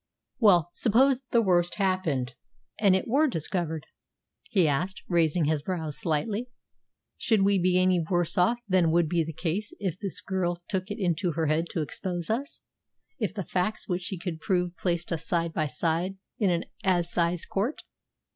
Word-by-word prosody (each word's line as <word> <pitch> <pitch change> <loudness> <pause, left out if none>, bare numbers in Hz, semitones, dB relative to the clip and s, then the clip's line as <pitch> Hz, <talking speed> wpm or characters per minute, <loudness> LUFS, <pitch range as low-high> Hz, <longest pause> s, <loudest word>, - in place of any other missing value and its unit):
"Well, 180 -7 +5
suppose 255 +3 +3
the 235 -1 +3
worst 175 -3 +2
happened, 180 - 0 0.5
and 200 -3 +5
it 190 - -1
were 285 +7 +3
discovered?" 165 - -2 0.6
he 185 -6 +3
asked, 175 +7 -1
raising 170 -2 +2
his 155 -1 +1
brows 160 -3 -3
slightly. 205 +10 -1 0.7
"Should 215 -4 +2
we 200 0 +3
be 180 0 +3
any 185 -2 +3
worse 175 -2 +1
off 185 +7 +3
than 185 -4 +3
would 170 0 +3
be 170 +1 +1
the 160 - -5
case 180 +6 -3
if 190 -4 -3
this 200 -2 -3
girl 180 -2 -1
took 190 0 -2
it 205 - -4
into 175 -3 0
her 160 +1 0
head 155 +2 +1
to 165 - 0
expose 175 +4 -4
us 270 +6 -3 0.6
if 215 -5 0
the 195 -2 -5
facts 185 +4 -1
which 180 -1 -1
she 185 +1 -4
could 170 -2 -5
prove 180 -2 0
placed 170 -1 -1
us 165 - -4
side 170 -1 0
by 155 -1 0
side 165 +7 -1 0.2
in 205 -4 +3
an 170 -1 0 0.2
assize 175 -2 +1
court?" 220 +10 -2
180 Hz, 175 wpm, -27 LUFS, 165-195 Hz, 0.7 s, Well